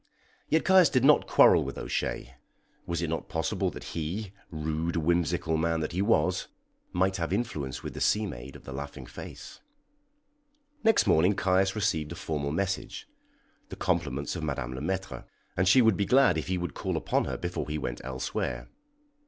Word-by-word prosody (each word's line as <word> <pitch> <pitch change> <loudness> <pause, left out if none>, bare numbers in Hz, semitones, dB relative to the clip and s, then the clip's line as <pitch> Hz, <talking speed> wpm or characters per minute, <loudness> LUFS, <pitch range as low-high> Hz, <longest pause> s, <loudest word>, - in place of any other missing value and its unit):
Yet 160 - +2
Caius 190 -3 +6
did 130 -3 +2
not 150 +1 +5
quarrel - - +6
with - - -6
O'Shea. 65 - -3 0.5
Was 85 0 -2
it 85 - -1
not 80 - -3
possible 80 -1 -1
that - - -9
he, 90 +6 -3 0.2
rude, 80 +1 -2
whimsical 85 0 +1
man 80 0 +1
that 75 - -2
he 90 +2 -1
was, 95 -4 +2 0.4
might 95 +2 +1
have 85 0 -2
influence 95 - -2
with - - -5
the - - -7
sea 105 0 +2
maid 65 -6 -8
of - - -12
the 70 - -8
laughing 70 +1 -7
face? - - -10 1.2
Next 225 -1 +4
morning 90 +6 +4
Caius 95 +1 +2
received 85 -8 0
a - - -5
formal 75 -5 -3
message 95 +4 -3 0.6
the - - -7
compliments 70 +6 -1
of 85 - -4
Madame 65 -5 -3
Le 65 - -6
Maître, 95 +4 -3 0.3
and 95 +1 +1
she 125 +6 +6
would 110 -4 +4
be 100 - +1
glad 135 -9 +5
if 80 - -3
he 95 0 0
would 90 -4 -4
call - - -2
upon - - 0
her - - -3
before - - -4
he 75 - -2
went - - -4
elsewhere. 65 -2 -3
85 Hz, 180 wpm, -28 LUFS, 75-95 Hz, 1.2 s, Caius